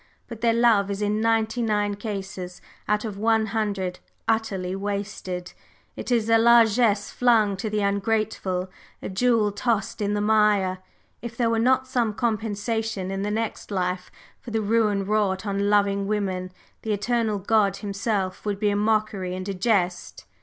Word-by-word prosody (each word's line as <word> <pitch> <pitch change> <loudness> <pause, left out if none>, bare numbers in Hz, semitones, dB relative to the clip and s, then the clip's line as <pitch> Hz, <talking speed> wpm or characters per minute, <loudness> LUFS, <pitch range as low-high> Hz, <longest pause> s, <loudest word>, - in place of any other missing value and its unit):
But 230 -2 -9
their 230 -1 +4
love 225 -4 +4
is 200 +1 -2
in 210 +1 0
ninety 225 +1 +1
nine 210 -2 +1
cases 195 -3 -6 0.3
out 210 +1 +1
of 205 -2 -6
a 225 0 +3
hundred 200 -4 -2 0.3
utterly 195 -5 -1
wasted; 195 -2 -4 0.4
it - - -6
is 230 -3 +2
a 225 0 +5
largesse 230 -2 +4
flung 225 -5 +3
to 215 +3 -3
the 210 0 -1
ungrateful, 200 -2 -1 0.3
a - - -4
jewel 220 +1 +2
tossed 220 +1 -1
in 205 0 0
the - - 0
mire! 210 -3 +2 0.4
If 235 0 -7
there 235 -2 +2
were 225 - +1
not 260 +2 +3
some 240 -5 0
compensation 220 -2 -2
in 195 0 -3
the 205 - -1
next 220 +1 -3
life 180 -2 -2 0.3
for 245 - -10
the 220 -1 -1
ruin 210 -2 +1
wrought 205 -1 0
on 200 0 0
loving 200 -1 +2
women, 190 -3 -2 0.3
the 220 - -1
Eternal 220 0 0
God 200 0 +2
himself 200 -2 -2
would 205 -2 -2
be 210 -1 +2
a - - 0
mockery 210 -3 0
and 185 +1 -5
a 200 - -2
jest." 185 -3 -1
210 Hz, 165 wpm, -24 LUFS, 195-225 Hz, 0.4 s, a